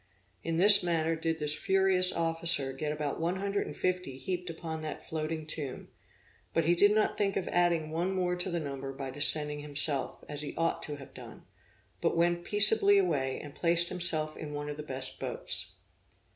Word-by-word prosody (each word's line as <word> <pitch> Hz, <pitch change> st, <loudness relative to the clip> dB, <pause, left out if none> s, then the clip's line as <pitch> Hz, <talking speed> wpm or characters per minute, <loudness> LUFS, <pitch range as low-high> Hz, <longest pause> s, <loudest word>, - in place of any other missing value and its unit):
In 165 Hz, 0 st, -2 dB
this 200 Hz, +3 st, +8 dB
manner 165 Hz, -2 st, 0 dB
did 160 Hz, 0 st, -2 dB
this 150 Hz, -1 st, 0 dB
furious 190 Hz, +1 st, +3 dB
officer 165 Hz, -4 st, +2 dB
get 150 Hz, +3 st, -3 dB
about 150 Hz, -2 st, -3 dB
one 170 Hz, +3 st, -1 dB
hundred 200 Hz, +1 st, -2 dB
and -, -, -7 dB
fifty 180 Hz, -7 st, -2 dB
heaped 180 Hz, +4 st, -4 dB
upon 160 Hz, -1 st, -6 dB
that 155 Hz, -1 st, -7 dB
floating 155 Hz, 0 st, -4 dB
tomb; 150 Hz, -4 st, -4 dB, 0.7 s
but 165 Hz, -, +2 dB
he 170 Hz, -, +4 dB
did 205 Hz, +4 st, +5 dB
not 215 Hz, -, +1 dB
think 195 Hz, -1 st, 0 dB
of 190 Hz, -, -3 dB
adding 170 Hz, -3 st, +1 dB
one 170 Hz, +4 st, -1 dB
more 180 Hz, -1 st, 0 dB
to 180 Hz, +1 st, -2 dB
the 170 Hz, -1 st, -2 dB
number 135 Hz, -3 st, -5 dB
by 135 Hz, -1 st, -6 dB
descending 150 Hz, +1 st, 0 dB
himself, 145 Hz, -1 st, +1 dB
as 145 Hz, 0 st, -4 dB
he 150 Hz, -, -6 dB
ought 165 Hz, 0 st, 0 dB
to 150 Hz, -, -6 dB
have 140 Hz, -2 st, -12 dB
done, -, -, -12 dB, 0.6 s
but -, -, 0 dB
went 175 Hz, 0 st, +1 dB
peaceably 205 Hz, 0 st, +4 dB
away, 145 Hz, -9 st, 0 dB
and 145 Hz, -1 st, -10 dB
placed 170 Hz, +1 st, +2 dB
himself 160 Hz, -4 st, -1 dB
in 150 Hz, -1 st, -7 dB
one 145 Hz, 0 st, -5 dB
of 145 Hz, -, -6 dB
the -, -, -5 dB
best 130 Hz, -3 st, -2 dB
boats. -, -, -4 dB
165 Hz, 190 wpm, -30 LUFS, 150-180 Hz, 0.7 s, this